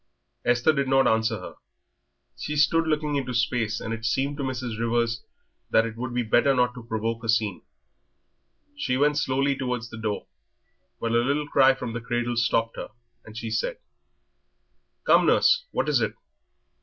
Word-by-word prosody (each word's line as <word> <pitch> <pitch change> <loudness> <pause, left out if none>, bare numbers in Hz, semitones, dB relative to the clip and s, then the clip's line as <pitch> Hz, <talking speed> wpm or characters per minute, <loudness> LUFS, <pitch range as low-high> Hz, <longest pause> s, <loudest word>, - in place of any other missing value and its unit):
Esther 120 +6 +3
did 140 -2 0
not 135 0 +4
answer 110 0 +1
her. 90 - -9 0.8
She 150 - -4
stood 160 +3 +3
looking 150 -2 0
into 130 -2 -3
space, 115 -2 0
and 115 - -4
it 115 0 -6
seemed 135 +5 0
to 140 - -3
Mrs. 125 -4 -4
Rivers 115 0 0 0.5
that 115 - +4
it 115 -1 -5
would 120 +1 -4
be 120 0 0
better 120 +5 +3
not 125 -1 +2
to 125 - -9
provoke 115 0 -3
a 115 - -5
scene. 110 -4 +1 1.1
She 130 - -1
went 145 +2 +3
towards 130 -3 -1
the 110 - -8
door 105 -2 -2
slowly, - - -43
but 115 - -2
a 120 - +4
little 145 +3 0
cry 135 -2 +5
from 120 -3 -5
the 120 - -4
cradle 120 +1 -2
stopped 115 -1 +1
her, - - -6 0.4
and 110 0 -11
she 115 -1 -5
said - - -1 1.3
"Come, - - +4
nurse, 485 0 +4
what - - -1
is - - +2
it? - - -1
120 Hz, 175 wpm, -25 LUFS, 115-135 Hz, 1.3 s, cry